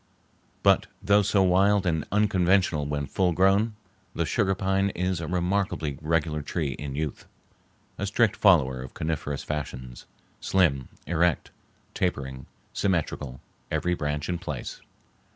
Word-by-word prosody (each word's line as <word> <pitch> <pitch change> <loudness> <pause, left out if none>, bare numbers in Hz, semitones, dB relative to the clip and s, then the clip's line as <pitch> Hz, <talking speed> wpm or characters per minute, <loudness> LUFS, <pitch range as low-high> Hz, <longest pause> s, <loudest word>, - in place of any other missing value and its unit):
But - - +4
though 100 0 +4
so 100 -1 +3
wild 95 +2 +3
and 80 -3 0
unconventional 95 -6 +2
when 70 -1 -2
full 90 +5 +1
grown, 100 +5 +3 0.4
the 85 - 0
sugar 95 +1 +1
pine 95 +1 +1
is 90 -1 -1
a 80 - -4
remarkably 90 -4 -1
regular 75 -1 0
tree 75 -1 -2
in 70 +1 -6
youth, 75 -1 -4 0.7
a 100 - -1
strict 105 +1 +2
follower 70 -10 +4
of 65 - -9
coniferous 75 -3 -3
fashions, 65 -5 -6 0.3
slim, 75 -9 +1 0.2
erect, 85 -2 +1 0.4
tapering, 65 -7 -2 0.3
symmetrical, 75 -8 -1 0.3
every 90 - 0
branch 75 -2 -2
in 90 -1 -2
place. 75 -7 -6
85 Hz, 130 wpm, -26 LUFS, 75-95 Hz, 0.7 s, But